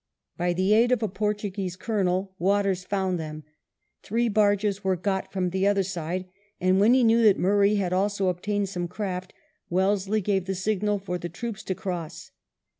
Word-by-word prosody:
By 175 0 0
the 185 +4 +2
aid 235 +3 +4
of 245 -3 +2
a - - +2
Portuguese 205 -2 -3
Colonel 190 -2 -1
Waters 195 0 +1
found 190 -2 -1
them; 155 -1 -6 0.6
three 230 +3 0
barges 205 -1 +2
were 190 -1 +2
got 190 +2 -2
from 185 -2 -1
the 190 +2 +1
other 200 -1 +3
side, 180 0 -4 0.3
and 185 +1 +3
when 220 +5 +5
he 260 - +4
knew 230 0 +4
that 210 -4 +5
Murray 200 +2 +3
had 185 -3 0
also 195 +1 +1
obtained 200 +3 -1
some 175 -2 -3
craft, 185 -1 -4 0.4
Wellesley 195 +3 +1
gave 195 -1 0
the 190 0 -2
signal 205 +2 0
for 180 -2 -4
the 175 - -5
troops 215 +4 -6
to 190 - -2
cross. 170 -5 -6
195 Hz, 180 wpm, -26 LUFS, 180-205 Hz, 0.6 s, when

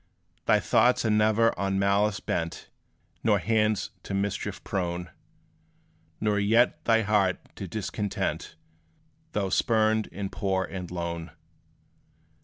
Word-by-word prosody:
Thy - - +5
thoughts 125 -1 +3
are 110 - +2
ne'er 110 +2 +3
on 95 0 0
malice 100 +1 +2
bent 85 -1 -4 0.5
Nor 105 -3 +4
hands 110 +1 +1
to 100 - -5
mischief 100 0 -2
prone; 90 -3 -3 1.1
Nor 105 -1 +1
yet 115 +4 +3
thy 115 -1 +4
heart 100 -3 +2 0.2
to 95 - -6
discontent; 105 -1 -3 0.8
Though 100 -2 -1
spurned, 110 0 +2
and 100 +1 -5
poor 95 -2 0
and 90 -3 -6
lone. 85 -2 -4
100 Hz, 115 wpm, -27 LUFS, 95-110 Hz, 1.1 s, Thy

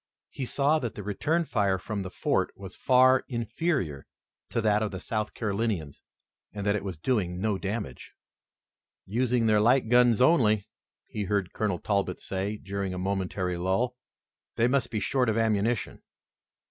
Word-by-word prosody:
He 135 - -4
saw 145 +4 +2
that 120 -6 -4
the 105 - -6
return 155 - 0
fire 100 -8 +1
from 100 +2 -4
the 95 - -5
fort - - 0
was 95 -2 -8
far 130 0 +5
inferior 120 - -2 0.4
to 120 - -1
that 105 -1 +2
of 110 - 0
the 95 - -6
South 110 +2 -3
Carolinians, 100 -8 -2 0.5
and 100 -1 -5
that 100 0 +2
it 105 - -2
was 95 -4 -5
doing 90 -2 -1
no 105 -1 0
damage. 100 - -5 0.9
"Using 120 +3 +1
their 110 -1 +4
light 120 +2 +3
guns 120 -2 +5
only," 115 - +4 0.4
he 105 -2 -4
heard 100 -3 -1
Colonel 105 -4 -1
Talbot 100 -1 -1
say 100 +2 -3
during 100 -2 -4
a - - -4
momentary 95 -1 -2
lull. 95 +8 0 0.6
"They 115 - +3
must 135 +1 +1
be 110 - -2
short 125 +2 +1
of 110 - 0
ammunition." 110 0 0
105 Hz, 160 wpm, -28 LUFS, 95-120 Hz, 0.9 s, far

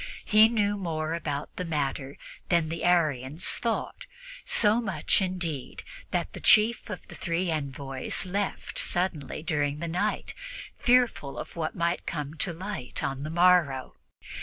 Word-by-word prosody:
He 215 +1 +7
knew 205 -3 +1
more 160 -4 -2
about 150 -3 -4
the 180 - -2
matter 140 -4 -2 0.3
than 170 -3 +3
the 165 +1 -4
Arians 155 -3 +2
thought 235 - -2 0.4
so 220 +2 +4
much, 190 -4 +1
indeed, 175 -8 -3 0.3
that - - -2
the - - -7
chief 220 +1 +5
of 205 - -7
the - - -11
three 170 0 -1
envoys 140 -1 -3
left 195 +2 -2
suddenly 175 -6 -2
during 145 -3 0
the 170 +2 -4
night, 185 +6 -1 0.5
fearful 245 - +2
of - - -7
what 160 -2 -3
might 170 0 -1
come 150 -3 -3
to 175 - -1
light 175 -6 -5
on 135 0 -2
the 150 - -4
morrow. 170 -6 +3
170 Hz, 145 wpm, -28 LUFS, 145-190 Hz, 0.5 s, He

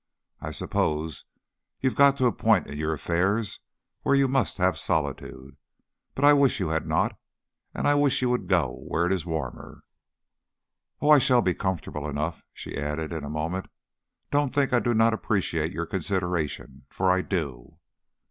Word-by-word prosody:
I - - -5
suppose 75 -2 -2 0.5
you 130 - +1
have - - -11
got 140 -1 +5
to 130 - +1
a 120 - +4
point 110 -5 +2
in 70 - -8
your 80 0 -1
affairs 95 +7 -1 0.4
where 140 - +2
you 140 0 +4
must 135 0 0
have 90 0 +1
solitude, 70 -2 -3 0.6
but 140 - +2
I 145 - +8
wish 140 -2 +3
you - - -1
had 80 0 -1
not, - - +1 0.6
and - - -1
I 145 - +5
wish 145 -1 +3
you 125 - +2
would 125 -7 -1
go 85 -10 0
where 85 - 0
it 90 - 0
is 90 -3 -3
warmer." 80 -2 -5 1.2
"Oh, 150 - +4
I 150 - +9
shall 125 -2 +4
be 90 - +2
comfortable 85 -6 -3
enough." 75 +4 -3
She - - -8
added 75 +3 -3
in 80 -3 -4
a 70 - -5
moment, 80 +5 -3 0.6
"Don't 145 -2 +1
think 140 -1 +1
I 120 - +5
do 120 -1 0
not 115 +1 +4
appreciate 85 -7 -1
your 85 -2 -3
consideration, 85 -8 -3
for 95 0 +1
I 95 0 +2
do." 70 -12 -4
90 Hz, 175 wpm, -26 LUFS, 80-125 Hz, 1.2 s, I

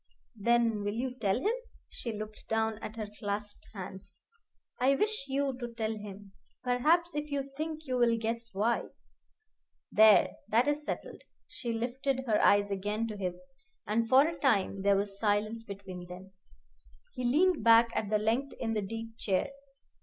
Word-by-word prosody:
"Then 230 -1 +2
will 205 +1 -2
you 250 +2 -2
tell 210 -4 0
him?" 420 - +1 0.3
She 235 - -5
looked 215 0 -8
down 220 -1 0
at 215 - -7
her 220 -2 -4
clasped 205 0 -4
hands. 190 -1 -8 0.6
"I 265 +2 +4
wish 420 -6 0
you 275 0 0
to 240 -2 -6
tell 220 -1 -1
him. 205 -1 -9 0.3
Perhaps 310 +7 +2
if 295 0 -3
you 275 -1 -3
think 310 +1 -4
you 255 -2 -1
will 235 -1 +4
guess 230 +1 -3
why. 215 +5 +1 1.1
There! 215 -1 +7 0.2
that 230 +5 +3
is 295 +1 0
settled." - - -5 0.3
She 235 - -5
lifted 255 +3 -1
her 220 -4 +2
eyes 205 0 +4
again 205 +3 -1
to 215 - -5
his, 185 +5 -5 0.4
and 225 +2 0
for 270 +5 +7
a 330 - -5
time 200 -7 +2
there 200 0 +4
was 200 0 -3
silence 215 +1 0
between 195 -4 -8
them. 185 +2 -10 0.8
He 255 - -5
leaned 305 +4 +3
back 230 +1 +7
at 210 - -1
length 225 +6 0
in 225 -2 -1
the 215 - 0
deep 225 +3 -6
chair. 195 +7 0
225 Hz, 165 wpm, -31 LUFS, 205-260 Hz, 1.1 s, There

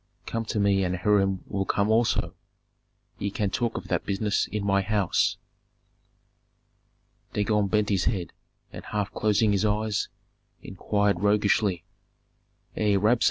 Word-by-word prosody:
Come 115 0 -3
to 110 0 -2
me 100 -1 +3
and 90 0 -1
Hiram 95 0 +1
will 95 0 -2
come 100 +2 0
also; 115 +1 +1 0.9
ye 100 - -1
can 100 0 -2
talk 120 +2 -1
of - - -7
that - - 0
business 100 +1 0
in 105 -1 -4
my 100 0 +3
house." 100 -2 +1 2.0
Dagon 105 -1 +1
bent 105 +1 +1
his 95 -3 +1
head, 95 -6 -2 0.4
and - - -8
half 105 -1 -2
closing 105 0 +2
his 100 0 +1
eyes, 105 0 0 0.6
inquired 100 0 0
roguishly, 105 -2 +2 0.9
"Ei, 105 -2 +2
Rabsun! 110 +5 +3
105 Hz, 135 wpm, -26 LUFS, 100-105 Hz, 2.0 s, me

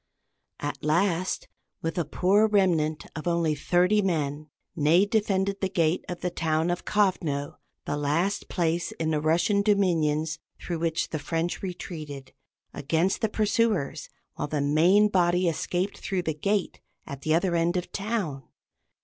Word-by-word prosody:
At 145 0 -5
last, 175 +3 0 0.4
with 165 0 -2
a 170 - 0
poor 200 +4 +3
remnant 170 -7 +1
of 155 +1 -5
only 170 -2 +1
thirty 180 +7 +2
men, 155 -5 -2 0.3
Ney 165 +5 +4
defended 200 -2 0
the 190 - 0
gate 170 -2 +1
of 180 - -5
the 180 - -1
town 160 0 0
of 175 - -4
Kovno 175 -9 0 0.3
the - - -2
last 165 +8 0
place 170 -1 0
in 160 -1 -2
the 150 -1 0
Russian 170 +6 +2
dominions 160 -6 +1 0.2
through 170 -2 -4
which 165 -1 -1
the 155 - -2
French 165 +3 -2
retreated 155 -7 -7 0.4
against 165 +6 0
the 220 - +1
pursuers, 210 - 0 0.2
while - - -4
the 150 0 -2
main 165 +9 +4
body 180 -2 +2
escaped 180 +4 -2
through 185 -2 -2
the 160 - -1
gate 200 +5 -1 0.2
at 140 -2 -8
the 155 +2 +2
other 175 +1 +1
end 170 +2 +1
of 180 - 0
the - - -17
town. 200 -10 -3
170 Hz, 155 wpm, -26 LUFS, 155-190 Hz, 0.4 s, Ney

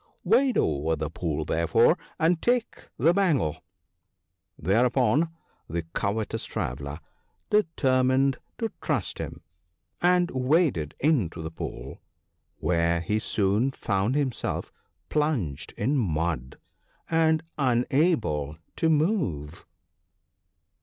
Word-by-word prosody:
' - - -42
Wade 245 +7 +3
over 80 +2 +1
the 80 0 -4
pool, 80 -2 -2
therefore, 85 +1 +3 0.2
and 165 +1 +2
take 245 -1 0
the 165 - +4
bangle." 140 - +1 0.9
Thereupon 125 - +2 0.4
the 85 +1 -2
covetous 105 +2 -1
Traveller 70 +4 -4 0.5
determined 135 -8 +2 0.2
to 225 -2 -2
trust 130 - -2
him, - - -6 0.6
and 180 0 +3
waded 130 - +1
into 110 - +1
the 80 - -5
pool, 70 -4 -7 0.6
where 85 -1 +1
he 105 +6 0
soon 105 +4 +1
found 100 +4 0
him 140 -3 +1
self - - -4 0.4
plunged 140 - -1
in 135 +8 +1
mud, 80 - -1 0.5
and 160 -1 +2 0.2
unable 120 - +1 0.2
to 165 - +2
move. 150 - 0
120 Hz, 105 wpm, -26 LUFS, -, 0.9 s, the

